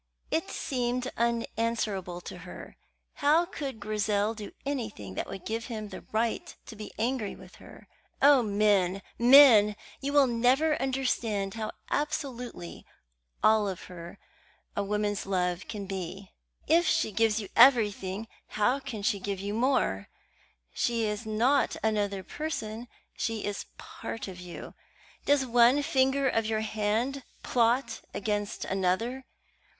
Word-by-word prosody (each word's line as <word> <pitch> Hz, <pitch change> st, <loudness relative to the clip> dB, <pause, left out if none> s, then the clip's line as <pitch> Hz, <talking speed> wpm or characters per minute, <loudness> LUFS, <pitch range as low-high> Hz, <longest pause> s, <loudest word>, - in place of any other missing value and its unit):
It 330 Hz, -, 0 dB
seemed 250 Hz, -1 st, -2 dB
unanswerable 230 Hz, -6 st, -1 dB
to -, -, -8 dB
her. -, -, -10 dB, 0.4 s
How 305 Hz, +4 st, +4 dB
could 280 Hz, -9 st, -6 dB
Grizel 210 Hz, 0 st, 0 dB
do 210 Hz, -2 st, -8 dB
anything 220 Hz, -, -4 dB
that -, -, -4 dB
would 190 Hz, -, -8 dB
give 225 Hz, +1 st, -3 dB
him 215 Hz, -3 st, -5 dB
the 190 Hz, -, -8 dB
right 225 Hz, +1 st, -1 dB
to 225 Hz, -, -10 dB
be 215 Hz, 0 st, -8 dB
angry 230 Hz, -2 st, -1 dB
with -, -, -15 dB
her? -, -, -14 dB, 0.3 s
Oh, 280 Hz, -2 st, +7 dB
men, 200 Hz, -3 st, +2 dB, 0.2 s
men! 235 Hz, -5 st, +8 dB, 0.3 s
will 280 Hz, 0 st, +4 dB
you 240 Hz, -, -2 dB
never 265 Hz, +7 st, +3 dB
understand 240 Hz, -7 st, -1 dB
how 220 Hz, -1 st, -4 dB, 0.2 s
absolutely 255 Hz, -, -3 dB, 0.6 s
all 215 Hz, -1 st, +5 dB
of 185 Hz, -, -6 dB
her 175 Hz, +1 st, -10 dB, 0.6 s
a 200 Hz, -, 0 dB
woman's 205 Hz, -1 st, -1 dB
love 180 Hz, -1 st, -1 dB
can 205 Hz, -3 st, -5 dB
be? 190 Hz, 0 st, -6 dB, 0.3 s
If 330 Hz, +2 st, +4 dB
she 220 Hz, -, +2 dB
gives 225 Hz, 0 st, +2 dB
you 205 Hz, -, -6 dB
everything, 220 Hz, -5 st, +4 dB, 0.2 s
how 245 Hz, +6 st, +1 dB
can 250 Hz, -7 st, -6 dB
she 200 Hz, 0 st, +1 dB
give 195 Hz, 0 st, -3 dB
you 200 Hz, +1 st, -3 dB
more? 230 Hz, -, +1 dB, 0.7 s
She 230 Hz, -2 st, 0 dB
is 210 Hz, +1 st, -3 dB
not 235 Hz, +6 st, +2 dB
another 205 Hz, -3 st, 0 dB
person; 240 Hz, -7 st, -5 dB, 0.3 s
she 225 Hz, -2 st, -2 dB
is 205 Hz, -1 st, -4 dB
part 225 Hz, -, -7 dB
of 185 Hz, -2 st, -8 dB
you. 180 Hz, -1 st, -9 dB, 0.5 s
Does 285 Hz, -2 st, +3 dB
one 245 Hz, +3 st, +5 dB
finger 270 Hz, 0 st, +2 dB
of 225 Hz, -3 st, +1 dB
your 220 Hz, -1 st, 0 dB
hand 220 Hz, +5 st, -1 dB, 0.2 s
plot 235 Hz, 0 st, +1 dB
against 205 Hz, 0 st, -2 dB
another? 195 Hz, +8 st, -1 dB
220 Hz, 135 wpm, -29 LUFS, 205-255 Hz, 0.7 s, men